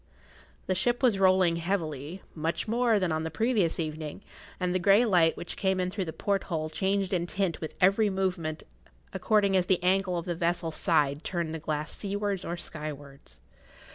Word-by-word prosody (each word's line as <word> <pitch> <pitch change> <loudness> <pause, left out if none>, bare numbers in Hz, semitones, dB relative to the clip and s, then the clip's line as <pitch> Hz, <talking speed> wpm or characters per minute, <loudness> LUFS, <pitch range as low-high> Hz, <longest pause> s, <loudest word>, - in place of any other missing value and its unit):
The 185 - 0
ship 240 +8 0
was 225 -6 +4
rolling 185 -3 +4
heavily, 165 -2 -3
much 165 +6 -2
more 235 0 +2
than 185 -4 0
on 155 0 0
the 160 - -3
previous 215 -3 +1
evening, 155 +3 -4 0.4
and 180 -1 0
the 185 - +1
grey 200 +6 +5
light 175 -6 +3
which 175 - -5
came 190 -2 0
in 180 0 -1
through 195 -1 -2
the 160 - -4
porthole 170 -5 -2
changed 195 +2 0
in 175 -1 0
tint 190 -2 -1
with 160 - -6
every 195 +3 +4
movement 180 -5 -2 0.5
according 205 -3 +2
as 180 -1 +2
the 180 -2 +2
angle 185 0 +2
of 170 - -4
the 175 - -1
vessel's 170 -1 -1
side 150 -3 +1
turned 170 -4 -2
the 160 - -3
glass 155 0 -3
seawards 200 -2 -2
or 175 - -4
skywards. 145 -4 -9
180 Hz, 180 wpm, -28 LUFS, 160-195 Hz, 0.5 s, grey